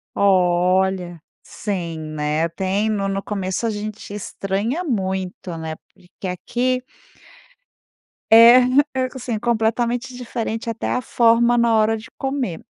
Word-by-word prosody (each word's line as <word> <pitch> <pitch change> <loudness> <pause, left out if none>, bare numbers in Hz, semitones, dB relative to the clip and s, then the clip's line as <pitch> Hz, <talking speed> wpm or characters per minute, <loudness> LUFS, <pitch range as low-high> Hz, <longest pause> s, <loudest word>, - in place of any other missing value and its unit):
Olha! 185 -2 +2 0.2
Sim, 175 -6 -4 0.2
né? 150 +2 0
Tem 190 +5 -1
no 200 -2 -1
no 195 0 -2
começo 195 +2 -3
a - - 0
gente 210 0 -6
estranha 205 - -3
muito, 190 - -3
né, 160 -1 -5 0.2
porque 180 +1 -10
aqui 250 +7 -1 1.5
É, 230 +2 +9
hã, 255 +3 +4
é 260 -1 -1
co 260 - -10
sim, 240 -3 -3
completamente 235 +2 0
diferente 230 -2 -4
até 230 -1 -3
a 250 - 0
forma 235 0 +3
na 235 -1 +3
hora 220 0 +3
de 220 - -11
comer. 265 - -2
215 Hz, 130 wpm, -21 LUFS, 185-235 Hz, 1.5 s, É